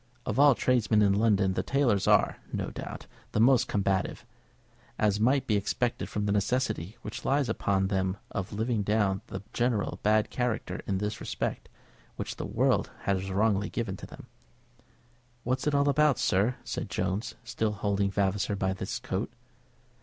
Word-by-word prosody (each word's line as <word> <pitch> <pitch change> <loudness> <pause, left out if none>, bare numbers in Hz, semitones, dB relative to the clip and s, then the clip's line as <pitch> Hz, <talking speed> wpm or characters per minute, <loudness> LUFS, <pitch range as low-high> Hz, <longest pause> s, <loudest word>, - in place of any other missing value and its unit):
Of 110 +4 -1
all 145 -2 +7
tradesmen 115 -4 +3
in 100 -1 +4
London 100 -2 +3
the 95 - 0
tailors 115 -2 +1
are, - - +4
no - - -3
doubt, - - -7 0.3
the - - +1
most 125 +2 +5
combative, 95 -2 -1 0.7
as 105 -1 +2
might 130 +4 +3
be 110 - +1
expected 115 +4 -1
from 105 -1 -2
the 100 - +1
necessity 105 -2 -1
which 105 - -6
lies 140 0 +2
upon 100 -3 +1
them 95 -1 0
of 95 0 -4
living 110 +1 0
down 100 -2 +1
the 95 +1 -6
general 120 -4 0
bad 105 0 +2
character 125 -3 -2
in 95 - 0
this 105 +2 -3
respect - - -3 0.5
which - - -5
the - - -4
world - - +1
has 95 -1 -1
wrongly 100 +1 +1
given 110 -6 -3
them. - - -11 1.2
"What's 130 +4 -1
it 145 - +2
all 140 0 +3
about, 150 0 +4
sir?" 105 +7 +2
said - - -4
Jones, 95 +5 -2
still 110 -2 -1
holding 100 -1 0
Vavasor 100 +1 0
by 95 -1 0
his 95 +4 -4
coat. 120 -5 -3
105 Hz, 160 wpm, -29 LUFS, 100-120 Hz, 1.2 s, all